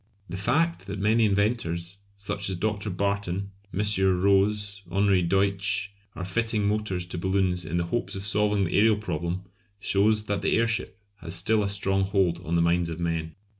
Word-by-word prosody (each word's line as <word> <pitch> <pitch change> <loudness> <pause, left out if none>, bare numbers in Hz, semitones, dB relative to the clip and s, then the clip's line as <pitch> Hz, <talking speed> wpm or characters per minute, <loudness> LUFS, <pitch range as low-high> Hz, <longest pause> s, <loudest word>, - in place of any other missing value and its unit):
The 90 - -5
fact 160 - 0
that 100 +1 -4
many 110 +3 +3
inventors, 100 -4 0 0.2
such 100 0 -2
as 95 - -1
Dr. 105 +2 -2
Barton, 100 0 -2 0.2
M. 95 +4 -1 0.4
Roze, 100 +1 +2
Henri 100 -1 +3
Deutsch, 100 +3 0 0.2
are 90 +2 -5
fitting 110 +2 0
motors 105 -4 -1
to 90 -1 -5
balloons 95 -1 +1
in 85 +2 -2
the 85 - +1
hopes 110 +7 -3
of 95 0 -6
solving 105 0 +1
the 85 - -2
aërial 105 +1 +4
problem 85 -2 -3 0.4
shows 105 +2 +2
that 100 -2 -2
the - - +2
airship 115 -3 -1 0.2
has 85 -1 -5
still 105 +5 +2
a 100 - 0
strong 95 -1 0
hold 95 -3 +1
on 85 -1 -2
the 85 - +3
minds 85 0 +2
of 80 0 -5
men. 80 -2 -2
100 Hz, 175 wpm, -26 LUFS, 90-105 Hz, 0.4 s, aërial